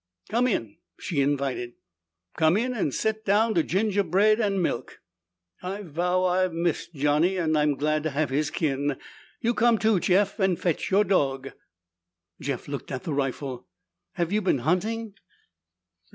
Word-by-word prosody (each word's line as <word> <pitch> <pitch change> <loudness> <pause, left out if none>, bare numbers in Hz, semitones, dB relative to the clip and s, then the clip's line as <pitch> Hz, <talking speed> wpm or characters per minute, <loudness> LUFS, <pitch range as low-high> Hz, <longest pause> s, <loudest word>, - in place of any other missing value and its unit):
"Come 240 +3 +2
in," 115 - -2 0.2
she 145 -5 -1
invited. 135 -3 -1 0.6
"Come 160 +4 +3
in 250 +3 0
and 200 - -1
set 220 +8 -1
down 220 +2 +3
to 170 - +3
gingerbread 200 +3 +2
and 200 -3 +1
milk. 165 -9 -2 0.6
I 195 +3 -5
vow 180 +2 0
I've 185 0 +1
missed 170 0 -2
Johnny 150 +6 +2
and 160 -3 +1
I'm 150 -1 +2
glad 155 +2 0
to 155 - -1
have 145 -1 -1
his 150 +3 0
kin! 145 -3 -1 0.4
You 235 0 +1
come, 235 -1 +3
too, 215 -2 +2
Jeff, 195 +4 +2
and 190 -3 +2
fetch 175 -4 -1
your 200 +2 +4
dog!" 135 -9 0 0.9
Jeff 135 -3 -4
looked 140 -1 -6
at 130 -2 -4
the 160 - -3
rifle. 135 -2 -3 0.5
"Have 170 0 -2
you 210 +1 +2
been 185 -7 +2
hunting?" 215 +6 0
175 Hz, 155 wpm, -26 LUFS, 145-205 Hz, 0.9 s, your